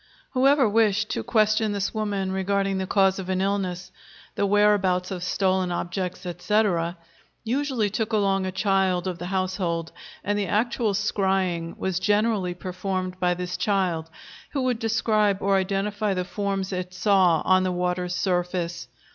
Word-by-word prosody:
Whoever 270 0 +4
wished 215 0 +2
to - - -1
question 215 -2 +2
this 200 -1 -2
woman 205 -3 -2
regarding 195 0 0
the 190 - -3
cause 195 -1 +3
of 190 -1 -6
an 185 0 0
illness, 190 -2 -2 0.4
the 200 - 0
whereabouts 195 -3 +2
of 185 -2 -4
stolen 185 0 +1
objects, 180 +1 -3
etc., 175 -1 0 0.5
usually 255 -2 0
took 220 +2 -2
along 195 -3 +1
a - - -2
child 190 -2 +1
of 180 -2 -4
the 175 - -5
household, 185 -3 -2 0.3
and 205 0 0
the 200 - -1
actual 220 +1 0
scrying 190 -4 0
was 185 -1 -1
generally 205 -2 +1
performed 185 0 -4
by 180 -1 +2
this 180 0 -4
child, 180 -6 0 0.4
who 275 -3 0
would 250 -3 0
describe 215 -3 +2
or 195 0 +2
identify 200 +2 -1
the 180 0 -2
forms 195 0 -3
it 180 0 -4
saw 180 -3 +3
on 185 0 +4
the 185 0 0
water's 180 0 -1
surface. 175 -6 -1
190 Hz, 155 wpm, -25 LUFS, 180-205 Hz, 0.5 s, Whoever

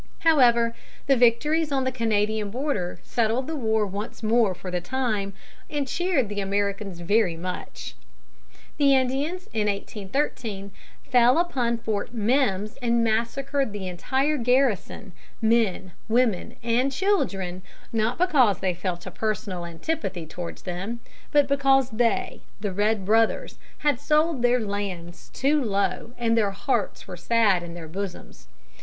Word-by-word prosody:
However, 240 -7 +4 0.3
the 275 - +4
victories 295 +7 +3
on 270 -1 +1
the 260 - 0
Canadian 215 -3 0
border 215 - -2
settled 235 +2 0
the 320 - -4
war 220 -5 +1
once 205 +4 -6
more 220 -3 +3
for 185 +1 -7
the 180 0 -1
time, 215 -3 -2 0.4
and 290 -3 -2
cheered 345 - +1
the 205 0 -4
Americans 200 -2 -2
very 185 -2 +2
much. 180 +2 -6 0.8
The 280 -2 +5
Indians 275 +8 -1
in 215 -2 +1
1813 200 0 -3 0.4
fell 245 +1 +5
upon 255 -9 +1
Fort 220 +1 -3
Mimms 215 -3 +1
and 235 -1 +2
massacred 235 +3 0
the 195 -2 -5
entire 265 - 0
garrison, 245 -5 +1 0.3
men, 220 -5 +1 0.2
women, 230 -1 +1
and 240 +4 +2
children, 195 - 0 0.3
not 225 +2 +1
because 280 - +4
they 185 -1 0
felt 175 0 -4
a 185 - -6
personal 190 -3 -3
antipathy 185 - -3
towards 170 +2 -7
them, 190 +6 -4 0.3
but 290 -1 +4
because 270 -2 +3
they 230 0 0 0.2
the 205 -1 -2
red 205 0 +1
brothers 225 - +2 0.2
had 290 -5 +1
sold 305 -1 +2
their 245 +1 +3
lands 195 -5 -5
too 285 +2 +1
low 205 +2 -1
and 230 -1 +1
their 215 -3 +3
hearts 200 +6 -2
were - - -6
sad 220 -6 +2
in 170 -1 -8
their 165 -2 -8
bosoms. 190 +3 -7
225 Hz, 140 wpm, -25 LUFS, 200-265 Hz, 0.8 s, The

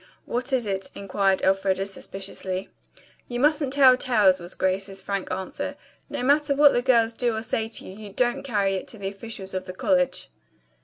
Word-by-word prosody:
"What 250 +3 -3
is 255 -3 +1
it?" 195 -1 -3
inquired 195 -1 0
Elfreda 195 0 +2
suspiciously. 195 -1 -6 0.6
"You 240 0 -4
mustn't 295 0 +2
tell 265 -3 +7
tales," 210 -8 +4
was 175 +1 -6
Grace's 195 +1 -1
frank 195 0 -3
answer. 185 0 -4 0.3
"No - - -3
matter 285 +1 +3
what 290 0 +6
the 245 - +2
girls 230 -3 +3
do 240 -1 0
or 220 - -3
say 220 0 -1
to 225 - -5
you, 205 +2 -9
don't 240 +4 +1
carry 205 -7 0
it 190 - -4
to 225 - -8
the 195 -1 -4
officials 195 -1 -7
of 185 0 -3
the 185 - -7
college." 185 -1 0
200 Hz, 185 wpm, -25 LUFS, 190-245 Hz, 0.6 s, tell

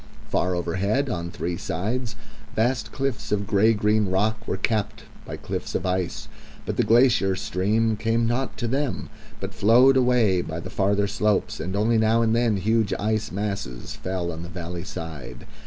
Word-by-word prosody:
Far 90 0 +1
overhead, 100 +10 0
on 85 -1 -3
three 85 0 -3
sides, 110 +8 -3 0.4
vast 115 +1 0
cliffs 135 -6 -3
of 100 -1 +1
grey 105 +4 +3
green 105 0 +2
rock 110 +3 0
were - - -1
capped 105 +1 -1 0.2
by - - -5
cliffs - - -5
of - - -1
ice; 90 -1 -2 0.4
but - - -2
the - - +2
glacier 115 -5 +4
stream 110 +3 0
came 115 +2 +1
not 120 +3 -1
to 120 - -2
them 135 +2 -2 0.3
but - - -5
flowed 125 +6 +5
away 120 -8 +3
by 80 -1 -5
the 95 +2 -7
farther 100 0 +1
slopes, 105 +1 0
and 95 +4 -3
only 110 +2 +2
now 110 +1 +3
and 115 0 +2
then 115 -3 +2
huge 110 +2 +1
ice 110 +1 -1
masses 100 -12 -4
fell 90 -2 -3
on 80 0 -7
the 85 - -7
valley 85 0 -6
side. 70 -9 -7
105 Hz, 170 wpm, -24 LUFS, 95-115 Hz, 0.4 s, flowed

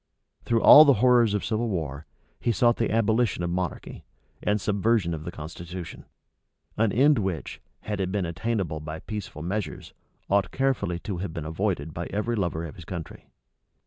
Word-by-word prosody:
Through 115 -1 +1
all 150 - +11
the 140 -3 +5
horrors 120 -2 +4
of 105 - -2
civil 115 +1 -1
war, 75 -6 -4 0.3
he 120 - +1
sought 120 +3 +3
the 115 - 0
abolition 110 -3 +1
of 85 - -2
monarchy, 90 -1 -4 0.4
and 105 +1 +1
subversion 100 -3 +1
of 80 -1 -6
the 85 - -4
constitution; 85 +2 -8 0.7
an 110 -1 +2
end 140 +4 +4
which, 95 -5 -4 0.2
had 105 -2 -3
it 95 -1 -2
been 100 -2 -1
attainable 90 -2 -2
by 75 +1 -6
peaceful 105 -7 -6
measures, 100 +4 -4 0.3
ought 100 -2 +2
carefully 130 -10 0
to 100 -4 -4
have 90 -2 -5
been 80 -2 -4
avoided 80 -2 -2
by 85 - -4
every 110 +3 -2
lover 85 -5 -2
of 80 - -9
his 85 - -11
country. 85 -2 -8
95 Hz, 175 wpm, -26 LUFS, 85-110 Hz, 0.7 s, all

